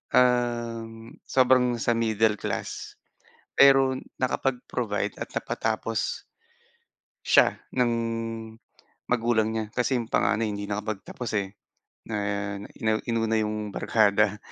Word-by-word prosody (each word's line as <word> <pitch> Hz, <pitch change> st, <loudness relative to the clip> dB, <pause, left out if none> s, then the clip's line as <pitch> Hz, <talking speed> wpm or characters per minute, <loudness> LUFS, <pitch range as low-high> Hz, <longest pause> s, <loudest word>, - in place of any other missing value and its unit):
um, 120 Hz, -2 st, +1 dB, 0.2 s
sobrang 125 Hz, -1 st, +4 dB
sa 120 Hz, -, +2 dB
middle 110 Hz, -1 st, +2 dB
class, -, -, -4 dB, 0.6 s
pero 135 Hz, -1 st, +6 dB, 0.2 s
nakapag-provide 125 Hz, -4 st, -1 dB
at -, -, -4 dB
napatapos 110 Hz, 0 st, -2 dB, 1.0 s
siya -, -, +5 dB, 0.2 s
ng 125 Hz, -2 st, +2 dB, 1.2 s
magulang 115 Hz, -2 st, +2 dB
niya. 110 Hz, -1 st, -1 dB
Kasi 125 Hz, +1 st, +1 dB
yung 115 Hz, -, -9 dB
panganay 110 Hz, +1 st, +2 dB
hindi 100 Hz, 0 st, -4 dB
nakapagtapos, 105 Hz, +2 st, -4 dB
eh, 100 Hz, 0 st, -3 dB, 0.5 s
na 110 Hz, -, -3 dB, 0.6 s
ina 110 Hz, -1 st, +1 dB
inuna 115 Hz, -1 st, +1 dB
yung 105 Hz, -1 st, -3 dB
barkada, 105 Hz, -1 st, +2 dB
115 Hz, 100 wpm, -26 LUFS, 110-125 Hz, 1.2 s, pero